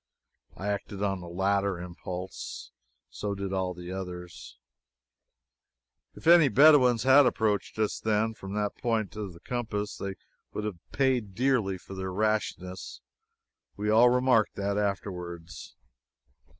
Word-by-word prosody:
I 100 - -5
acted 100 0 -3
on 95 -2 0
the 85 - -8
latter 100 +1 0
impulse. 90 +1 -7 0.4
So 100 -1 -3
did 100 -1 -4
all 95 -1 -1
the 90 0 -8
others. 90 -7 -7 1.6
If - - -13
any 170 -2 +8
Bedouins 130 -2 +6
had 135 +1 +7
approached 105 -4 0
us, 110 -1 0
then, 110 +1 +1
from 100 -2 -8
that 105 -1 -1
point 110 -6 -1
of 105 -4 -5
the 85 - -14
compass, 110 -3 -3
they 100 -1 -4 0.4
would 105 - -3
have 105 -5 -4
paid 125 -8 0
dearly 120 -6 +1
for 95 - -12
their 95 0 -4
rashness. 95 -2 -2 0.8
We 105 +1 0
all 115 +3 +7
remarked 125 -3 +3
that, 100 0 -1
afterwards. 90 -5 -4
100 Hz, 135 wpm, -28 LUFS, 95-110 Hz, 1.6 s, any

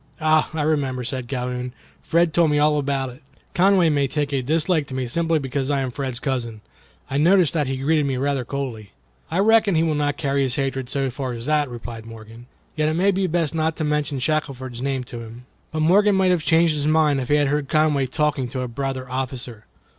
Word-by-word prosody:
"Ah! 155 0 +3
I 155 - 0
remember," 140 -5 0
said 130 0 -4
Calhoun; 125 -1 -4 0.3
"Fred 170 -1 +1
told 170 -1 +4
me 150 - +2
all 150 0 +3
about 135 -2 -1
it. 125 +5 -15 0.3
Conway 185 -1 +4
may 145 -2 +1
take 145 0 -2
a 135 - +1
dislike 155 +3 +1
to 130 - -6
me 130 -1 -1
simply 165 +5 +1
because 135 -1 -2
I 140 -1 +1
am 130 -1 -2
Fred's 130 -2 -3
cousin. 120 -6 -3 0.5
I 140 - 0
noticed 175 +2 +4
that 150 -4 0
he 135 0 -2
greeted 145 +2 +1
me 135 -2 -1
rather 140 0 0
coldly." 120 -6 -5 0.4
"I 165 - -2
reckon 215 -1 +4
he 160 - +3
will 160 -2 +1
not 145 -1 0
carry 140 -2 0
his 130 -2 +1
hatred 135 -3 -2
so 135 -1 -1
far 130 -1 -4
as 115 0 -7
that," 150 -1 +1
replied 115 -2 -8
Morgan, 115 +1 -12 0.3
"yet 155 -1 +1
it 155 - -1
may 190 +4 +3
be 190 0 0
best 165 -3 0
not 160 0 0
to - - -3
mention 150 -1 -1
Shackelford's 130 -3 -2
name 135 -1 -1
to 120 -1 -8
him." 115 +2 -10 0.3
But 155 - -2
Morgan 200 +5 +4
might 190 -1 +3
have 175 -4 +1
changed 165 0 +3
his 150 -1 -1
mind 155 -3 +3
if 125 - -6
he 145 - +4
had 145 -2 +2
heard 145 -1 -1
Conway 150 -3 +2
talking 150 -2 0
to 130 +1 -4
a 125 - -3
brother 130 +1 -4
officer. 125 -3 -5
140 Hz, 225 wpm, -22 LUFS, 130-155 Hz, 0.5 s, told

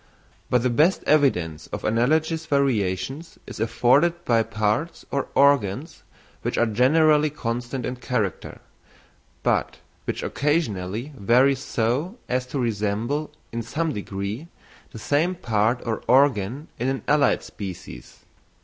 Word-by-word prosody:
But 125 -1 +2
the 125 - +2
best 155 +10 +3
evidence 90 - +2
of - - -6
analogous 155 +8 +1
variations 135 - -1
is - - -9
afforded 140 +10 +2
by 115 -2 +3
parts 110 +7 -1
or 140 -1 -1
organs 140 - +2 0.4
which - - -2
are 120 - +4
generally 150 +7 +4
constant 120 -2 -4
in 125 0 -4
character, 120 -6 -3 0.8
but - - 0 0.3
which - - -3
occasionally 125 - -1
vary 125 +6 +4
so 135 - -2
as 125 0 -1
to 135 - -4
resemble, 115 +5 -1 0.2
in 115 - -3
some 155 +7 -2
degree, 100 +7 -5 0.4
the - - -11
same 150 +10 +1
part 115 -3 0
or 115 -2 -2
organ 130 0 +3
in 125 - -1
an 135 0 -3
allied 145 -1 +3
species. 95 -4 -9
125 Hz, 125 wpm, -24 LUFS, 110-145 Hz, 0.8 s, are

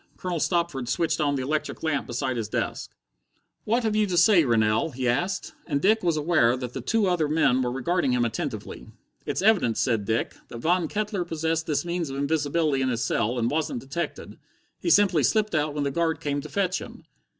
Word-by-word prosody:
Colonel 180 -2 -3
Stopford 170 -8 -1
switched 165 +1 0
on 145 -1 +1
the 130 - -2
electric 150 +4 -3
lamp 160 -3 -1
beside 125 +2 -2
his 110 -3 -3
desk. - - -3 0.8
"What 235 +3 +1
have 220 -1 0
you 215 -1 +2
to 180 -2 -1
say, 180 0 +6
Rennell?" 110 +3 +2
he 130 -3 -3
asked; 175 +10 -1
and 145 -4 0
Dick 215 +7 +3
was 170 -3 +1
aware 150 -6 +3
that 125 -1 -6
the 130 - -5
two 220 - +1
other 175 -5 +1
men 145 -4 +2
were 125 -1 -1
regarding 140 +3 0
him 125 -1 +2
attentively. 115 - -5 0.4
"It's - - -1
evident," 195 - +3
said 115 -5 +1
Dick, 110 +2 -1
"that 120 - -8
Von 170 +6 +1
Kettler 205 0 -2
possessed 160 -1 -2
this 150 +2 0
means 170 -3 -2
of 135 - -5
invisibility 145 0 0
in 130 - +1
his 120 -1 -1
cell, 115 +2 0
and 120 0 0
wasn't 150 -5 -1
detected. 160 +6 -5 0.4
He - - -2
simply 195 - +4
slipped 215 - +1
out 150 -1 0
when 145 - -1
the 140 - -1
guard 165 +2 0
came 145 -1 -2
to 155 - -9
fetch 190 0 0
him." - - -11
155 Hz, 205 wpm, -25 LUFS, 130-175 Hz, 0.8 s, say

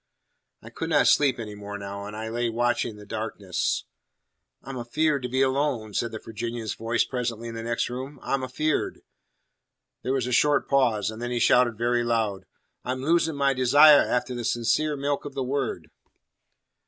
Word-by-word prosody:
I - - -11
could - - -4
not - - +4
sleep 140 -3 +4
any 110 -3 -6
more 105 0 -7
now, 100 0 -6
and 105 - -8
I 110 0 -4
lay 120 +1 -1
watching 120 -1 0
the 105 0 -12
darkness. 105 -3 -2 0.8
"I'm 135 0 -7
afeard 145 +4 0
to 125 - -4
be 130 +2 +2
alone!" 130 -5 0
said 115 +2 -1
the 110 - -5
Virginian's 115 +1 -5
voice 115 +1 0
presently 120 -2 -3
in - - -7
the 115 - -5
next 115 0 -1
room. 130 +3 -6
"I'm 135 -1 -1
afeard." 150 +4 -1 1.0
There 130 - -2
was 130 -3 0
a 125 - -3
short 145 +4 +3
pause, 115 -7 +2
and 110 +1 -9
then 120 - -3
he 120 - -2
shouted 120 -1 +4
very 120 +1 +1
loud, 110 -4 -1 0.4
"I'm 130 +1 -3
losin' 165 0 +2
my 140 -1 +2
desire 145 +4 +7
afteh 125 +1 -1
the 120 - -4
sincere 140 +6 +1
milk 140 0 -1
of 145 -2 -8
the 135 - -1
Word!" 125 - -3
120 Hz, 180 wpm, -26 LUFS, 115-135 Hz, 1.0 s, desire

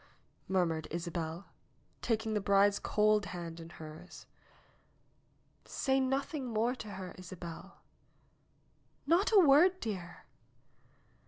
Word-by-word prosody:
murmured 165 -5 0
Isabel, 170 +1 -4 0.6
taking 220 -1 -1
the 210 - 0
bride's 200 +1 +4
cold 210 -1 +2
hand 170 -2 -6
in 165 0 -9
hers. 160 +1 -11 1.4
"Say 265 0 0
nothing 270 +1 -1
more 230 +1 +1
to 215 -5 -8
her, 185 -1 -7
Isabel." 180 +1 -9 1.2
"Not 345 +9 +3
a 435 - +6
word, 350 +4 +6
dear." 190 - -6
200 Hz, 100 wpm, -32 LUFS, 170-250 Hz, 1.4 s, a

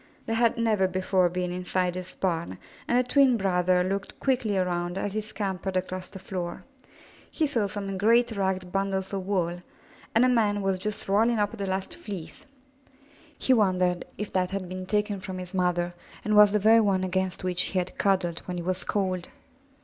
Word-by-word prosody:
They 225 - -2
had 230 0 +2
never 215 -5 +2
before 185 0 +1
been 180 0 -2
inside 180 0 -1
this 185 0 -7
barn, 170 -3 -2 0.3
and 240 - +2
the 250 0 +2
twin 265 -2 +5
brother 180 -2 +2
looked 195 +1 -3
quickly 245 -7 +1
around 175 -1 -1
as 195 0 -2
he 215 - -1
scampered 195 -3 -3
across 185 0 -4
the 195 - -9
floor. 180 -1 -5 0.7
He 320 - 0
saw 235 -8 +1
some 195 -1 -4
great 235 +3 +4
ragged 190 -3 -1
bundles 195 0 -1
of 190 -1 -3
wool, 175 -3 0 0.6
and 230 +3 +6
a - - +5
man 210 -5 +2
was 190 -1 0
just 210 +2 -4
rolling 225 +4 +3
up 205 +1 0
the 200 -3 -4
last 190 0 -2
fleece. 195 - -8 0.9
He 260 - +3
wondered 185 -5 +2
if 210 - -5
that 185 -1 +1
had 195 -2 -4
been 185 +1 -6
taken 210 0 0
from 190 0 -6
his 180 0 -7
mother 175 -1 0 0.3
and 215 0 +2
was 210 -1 +8
the 210 - +3
very 220 +2 +6
one 195 -3 +2
against 185 0 -1
which 180 -1 0
he 190 - -2
had 180 0 -2
cuddled 185 -4 +1
when 180 -1 -3
he 175 - -4
was 185 +1 0
cold. 185 -3 -1
190 Hz, 190 wpm, -27 LUFS, 180-210 Hz, 0.9 s, was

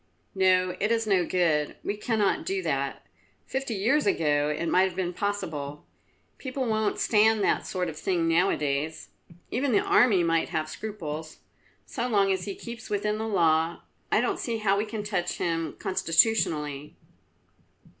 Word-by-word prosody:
"No, 185 -1 +3
it 210 +3 +1
is 225 -1 +1
no 190 -5 +2
good; 160 -5 +1
we 205 - -2
cannot 210 -1 0
do 385 0 -2
that. - - -2 0.4
Fifty 265 -4 -3
years 235 +8 +2
ago 150 -5 +2
it 150 +3 -2
might 185 +2 +4
have 185 - -8
been 180 -1 -2
possible. 155 -8 -4 0.5
People 260 0 -3
won't 220 -2 0
stand 220 -1 +3
that - - +1
sort 180 -1 -2
of 160 - -5
thing 170 +1 0
now 175 +4 +3
a - - 0
days; 150 +2 -2 0.4
even 255 +1 0
the 205 - +5
army 210 -6 +4
might 165 -1 +1
have 155 -2 -2
scruples. 160 -5 -6 0.5
So 245 -2 -3
long 200 -4 +3
as 190 -1 -1
he 200 -2 -5
keeps 235 -2 -9
within 210 +1 -1
the 220 - -2
law, 165 -4 +2 0.3
I - - +4
don't - - -1
see 230 -2 -2
how 205 -2 +2
we 205 +2 0
can 215 -1 -5
touch 185 -4 -2
him 165 -1 -2
constitutionally." 160 -6 +1
190 Hz, 165 wpm, -27 LUFS, 165-215 Hz, 0.5 s, the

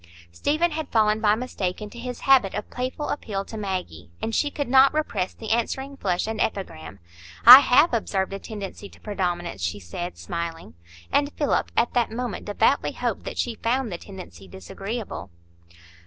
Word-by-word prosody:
Stephen 310 - 0
had 310 -2 -4
fallen 215 -1 +2
by 210 -1 +4
mistake 210 -6 -3
into 210 +3 -8
his 250 0 -6
habit 260 -8 +4
of 210 - -4
playful 255 +4 -4
appeal 200 -8 -3
to 220 - -9
Maggie, 185 - -5
and 225 - -3
she 290 - +1
could 285 0 -4
not 265 +2 +6
repress 205 -12 -1
the 220 -2 -6
answering 265 +4 -1
flush 185 -8 -1
and 220 0 -3
epigram. 100 - -4 0.5
"I 250 +3 +14
have 285 +3 +4
observed 195 -4 -1
a 195 - -4
tendency 200 -2 -8
to - - -18
predominance," 175 - -3
she 85 +4 -2
said, 175 - -6
smiling; 170 - -5 0.4
and 285 0 +2
Philip 290 - 0
at 235 - +2
that 240 -2 +2
moment 240 0 -4
devoutly 225 +6 +1
hoped - - -3
that - - -6
she 240 - -1
found 240 0 0
the 170 - -5
tendency 180 - -11
disagreeable. 195 - -6
215 Hz, 170 wpm, -24 LUFS, 185-250 Hz, 0.5 s, I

